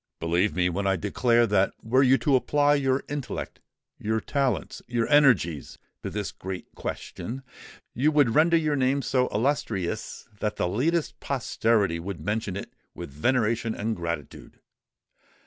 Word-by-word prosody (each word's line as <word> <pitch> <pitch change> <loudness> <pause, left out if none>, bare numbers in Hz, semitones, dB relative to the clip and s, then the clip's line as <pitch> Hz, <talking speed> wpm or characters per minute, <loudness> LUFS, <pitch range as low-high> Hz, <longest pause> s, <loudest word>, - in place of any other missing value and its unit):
Believe 85 +5 +1
me, 90 -1 +2
when 100 +3 -1
I 95 - +3
declare 115 +5 +2
that 100 -3 +2
were 125 +4 +3
you 135 0 +5
to 140 -3 +4
apply 145 +3 +3
your 135 -2 +1
intellect—your 120 -5 -5
talents—your 120 - -1
energies, 105 - +3 0.2
to - - -4
this - - -4
great 95 -2 -7
question, 130 +4 -6 0.5
you 145 +6 +2
would 145 -7 +3
render 165 +2 +5
your 155 -2 +1
name 135 +1 +1
so 125 0 +1
illustrious 105 -6 -2
that 105 0 -1
the - - 0
latest 150 - 0
posterity 110 -9 0
would 95 +1 -6
mention 105 -2 -2
it - - -8 0.2
with - - -7
veneration 115 - 0
and 110 +2 -2
gratitude!" 85 -4 -6
115 Hz, 140 wpm, -26 LUFS, 95-135 Hz, 0.5 s, you